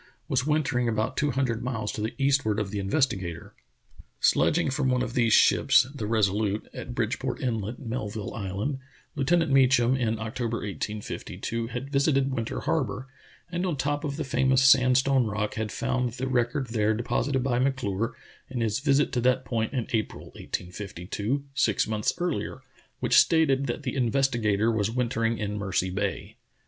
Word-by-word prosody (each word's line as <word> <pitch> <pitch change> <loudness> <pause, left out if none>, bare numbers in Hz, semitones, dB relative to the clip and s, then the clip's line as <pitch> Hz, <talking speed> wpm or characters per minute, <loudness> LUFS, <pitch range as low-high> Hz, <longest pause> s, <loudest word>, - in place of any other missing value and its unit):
was 135 -2 0
wintering 135 -6 +1
about 110 -1 -1
two 145 - +1
hun 135 0 +1
dred 115 -2 -2
miles 115 -4 -3
to 105 - -5
the 110 +2 -3
eastward 135 -6 +2
of 100 -3 -3
the 105 - -3
Investigator. 95 - -1 0.7
Sledg - - +3
ing 165 -6 +1
from 135 0 0
one 125 0 +2
of 120 -2 -4
these 120 -3 +2
ships, - - +5
the 135 -7 -4
Resolute^ 105 -1 +1
at 120 - -7
Bridgeport 125 +2 -2
Inlet, 115 -3 -2
Melville 110 -5 -5
Island, 105 +7 -3 0.4
Lieutenant 160 +3 +2
Mecham, 130 -2 +4
in 115 -3 0
October, 115 +1 -3
1852, 105 +3 -4
had 125 +3 -6
visited 135 -1 +2
Winter 115 -2 -3
Harbor, 130 -4 -2 0.4
and 175 +1 -2
on 175 -6 -1
top 145 +2 -1
of 140 -2 -3
the 155 - -3
famous 130 -1 +2
sandstone 130 -1 +5
rock 105 0 -2
had 110 -1 -3
found 125 +2 -1
the 130 +1 -4
record 125 +1 0
there 110 -1 +1
deposited 120 +3 -1
by 125 -2 +1
M'Clure 125 -5 -1 0.4
in 125 -2 -3
his 110 0 0
visit 140 +1 +2
to 125 - 0
that 130 +1 +2
point 115 -2 -1
in 125 -5 -2
April, 110 -2 -2
1852, 100 +7 -4
six 115 -7 +2
months 105 -1 0
earher, 175 -2 -3 0.4
which - - +2
stated 140 -4 +3
that 120 +5 -3
the 130 - -3
Investigator 120 -4 +1
was 110 -2 0
wintering 115 -1 0
in 105 -1 -3
Mercy 95 -2 -1
Bay. 100 +1 -3
120 Hz, 165 wpm, -27 LUFS, 110-135 Hz, 0.7 s, ships